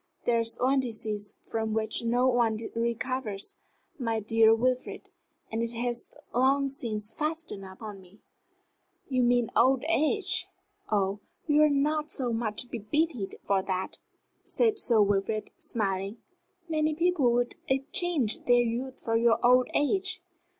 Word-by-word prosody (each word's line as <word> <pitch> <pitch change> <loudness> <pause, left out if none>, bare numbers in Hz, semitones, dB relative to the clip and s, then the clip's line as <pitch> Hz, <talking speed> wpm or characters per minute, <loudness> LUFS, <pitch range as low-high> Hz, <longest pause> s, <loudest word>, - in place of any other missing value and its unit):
There 235 -1 +3
is 230 0 +1
one 265 +2 +3
disease 215 -4 -3
from 220 -1 -3
which 220 +1 0
no 245 +2 +2
one 240 -3 +2 0.2
recovers, 235 -2 -2 0.4
my 230 -3 -1
dear 220 +1 +4
Wilfrid, 250 +3 0 0.4
and 225 +1 -1
it 235 0 -2
has 240 0 -2 0.2
long 275 +3 +3
since 220 -5 -3
fastened 310 -9 -3
upon 195 +1 -9
me." 185 +2 -19 0.9
"You 255 -2 +1
mean 245 -1 +2
old 260 +1 +4
age? 335 +5 +1 0.4
Oh, 200 -1 +1 0.3
you 300 -1 +4
are 305 - +6
not 300 +2 +1
so 250 -4 -2
much 225 -1 0
to - - -18
be 235 - -5
pitied 245 -1 -1
for 195 -1 +2
that," 190 0 -3 0.4
said 445 -3 +1
Sir 225 - +4
Wilfrid, 205 +2 -1
smiling. 195 -1 -2 0.5
"Many 310 -1 0
people 335 -7 +2
would 245 0 0
exchange 275 - +1
their 245 0 +5
youth 245 +3 -3
for 225 - -1
your 230 0 +4
old 250 0 +5
age." 370 +4 +1
240 Hz, 145 wpm, -28 LUFS, 220-275 Hz, 0.9 s, are